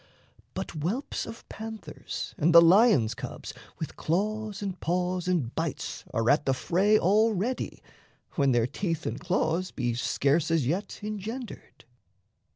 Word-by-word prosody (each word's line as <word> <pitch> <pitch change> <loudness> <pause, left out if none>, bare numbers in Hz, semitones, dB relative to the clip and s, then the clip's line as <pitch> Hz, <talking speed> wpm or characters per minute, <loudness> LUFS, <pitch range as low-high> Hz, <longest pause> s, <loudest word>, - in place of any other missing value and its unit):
But - - -4
whelps 180 - -3
of 230 +1 -10
panthers 220 0 -7
and 170 -2 +2
the - - +13
lion's 170 - +5
cubs - - -7 0.2
With - - -6
claws 210 +4 -1
and 190 -2 -4
paws 180 +1 -1
and 160 -10 0
bites 165 -3 -4
are 115 -2 0
at 145 0 +2
the 135 - +3
fray 195 +10 +3
Already, 215 +4 +1 0.5
when 140 -3 +2
their 120 -2 +3
teeth 165 +5 -3
and - - -3
claws 180 0 0
be 120 -2 -2
scarce 140 +6 +1
As 165 -5 +2
yet 180 - -2
engendered. 215 +4 -6
180 Hz, 140 wpm, -28 LUFS, 150-215 Hz, 0.5 s, the